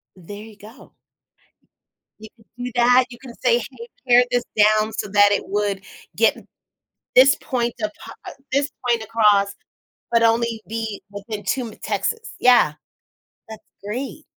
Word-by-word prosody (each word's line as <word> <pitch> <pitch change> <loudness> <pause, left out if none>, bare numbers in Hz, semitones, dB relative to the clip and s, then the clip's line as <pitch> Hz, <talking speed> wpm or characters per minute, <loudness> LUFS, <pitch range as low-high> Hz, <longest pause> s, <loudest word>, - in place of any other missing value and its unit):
There 205 +4 -10
you 215 -2 -14
go. 220 +5 -15 1.3
You 220 0 -11
could 220 -2 -25 0.2
do 250 - -4
that, 245 +1 +5
you 240 - -11
can 255 -3 -11
say, 240 -2 +4
"Hey, 235 -1 -9 0.2
pair 245 0 +6
this 245 -1 +1
down 215 +1 +4
so - - -4
that 205 0 +5
it 205 - -1
would 200 -1 -2 0.3
get - - +3 0.8
this 270 +2 +7
point 240 -3 -2
of 210 - -1
pa - - -10 0.4
this 280 +2 +1 0.2
point 235 -2 +1
across 210 -3 +2 0.6
but 230 -1 +3
only 230 0 +1
be 220 -2 -5
within 205 +1 -7
2 240 +6 -2
m 215 - -10
Texas. 460 -1 -3
Yeah. 245 -11 +5 0.8
That's 220 - -10 0.2
great. 260 +8 -5
225 Hz, 150 wpm, -21 LUFS, 210-245 Hz, 1.3 s, this